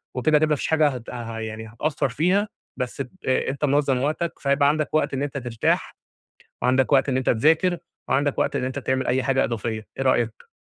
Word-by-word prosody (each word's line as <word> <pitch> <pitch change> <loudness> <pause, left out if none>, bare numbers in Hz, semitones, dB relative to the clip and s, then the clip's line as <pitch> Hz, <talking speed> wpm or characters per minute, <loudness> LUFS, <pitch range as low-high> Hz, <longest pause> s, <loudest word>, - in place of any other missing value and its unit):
وكده 150 +4 +3
هتبقى 155 +1 +2
ما 150 - +3
فيش - - -3
حاجة 155 -2 +4
هت 125 -3 -7
هي 115 -2 -5
يعني 110 +1 -7
هتقصر 140 +4 -1
فيها، 185 - +1 0.3
بس 125 +2 -3
ب 125 - -5 0.2
أنت 135 +2 0
منظم 140 -2 +2
وقتك، 155 +4 -1
فهيبقى 140 +1 +3
عندك 155 0 -1
وقت 155 - +1
إن 135 +1 -1
أنت 140 -1 -4
ترتاح 120 -3 -1 0.7
وعندك 130 +2 +2
وقت 135 +1 +4
إن 130 - +1
أنت 130 - +1
تذاكر، 160 +9 +3 0.3
وعندك 140 +1 +1
وقت - - +1
إن - - -1
أنت 130 +2 -3
تعمل 130 -1 -1
أي 130 +1 +1
حاجة 135 -1 +2
إضافية، 110 -1 -3
إيه 135 - -1
رأيك؟ 115 -3 0
135 Hz, 205 wpm, -24 LUFS, 125-150 Hz, 0.7 s, حاجة